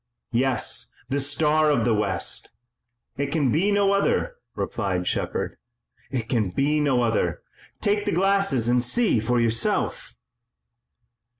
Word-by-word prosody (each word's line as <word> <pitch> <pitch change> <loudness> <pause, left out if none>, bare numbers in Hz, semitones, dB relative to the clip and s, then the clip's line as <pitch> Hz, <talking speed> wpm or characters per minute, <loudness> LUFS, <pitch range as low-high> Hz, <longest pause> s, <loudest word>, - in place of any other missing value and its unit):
"Yes, 130 +1 0 0.2
the 140 +1 0
Star 150 +2 +2
of 130 -7 +2
the 120 - +3
West! 100 -4 -1 0.7
It 140 +1 -1
can 140 -3 +1
be 185 - +2
no 200 -1 +3
other!" 485 - 0 0.2
replied 95 -5 -2
Shepard. - - -2 0.5
"It 120 -4 -3
can 110 -6 0
be 145 +9 +1
no 135 -5 +2
other! 115 -1 0 0.4
Take 205 0 +1
the 205 - 0
glasses 195 - +2
and 120 0 +3
see 205 - +2
for 120 +3 +1
yourself!" 115 -1 -1
135 Hz, 130 wpm, -24 LUFS, 115-165 Hz, 0.7 s, the